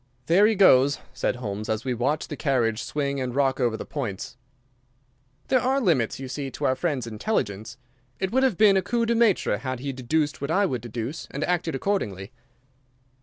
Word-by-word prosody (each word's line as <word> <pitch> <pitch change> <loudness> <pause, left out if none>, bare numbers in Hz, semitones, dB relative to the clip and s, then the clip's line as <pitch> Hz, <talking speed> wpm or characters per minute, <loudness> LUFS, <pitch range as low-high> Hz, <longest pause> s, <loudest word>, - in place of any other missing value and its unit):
"There 190 +7 +5
he 220 - +2
goes," 140 -8 +5 0.2
said 130 - -1
Holmes, 105 -3 -5
as 110 +3 -2
we 130 - 0
watched 135 +6 -1
the 150 - -4
carriage 120 -7 0
swing 140 -2 -2
and 125 -1 -3
rock 135 -1 +1
over 120 -3 +1
the - - -6
points. 115 -10 -5 1.1
"There 255 -2 +3
are 265 +2 +2
limits, 155 - +1
you 135 - -6
see, 135 +1 -4
to - - -5
our 130 - +2
friend's 135 -3 -2
intelligence. 110 - -3 0.4
It 190 0 -1
would 260 - +2
have 260 -9 +2
been 205 -3 +6
a - - +3
coup 235 +3 0
de 235 - +1
maître 230 -4 +2
had 130 -2 -4
he 135 +1 -4
deduced 145 +4 -1
what 140 - -3
I 200 +5 +3
would 125 - -2
deduce 120 +6 -5
and 140 - -4
acted 170 -3 -1
accordingly." 110 - -2
140 Hz, 195 wpm, -25 LUFS, 120-185 Hz, 1.1 s, been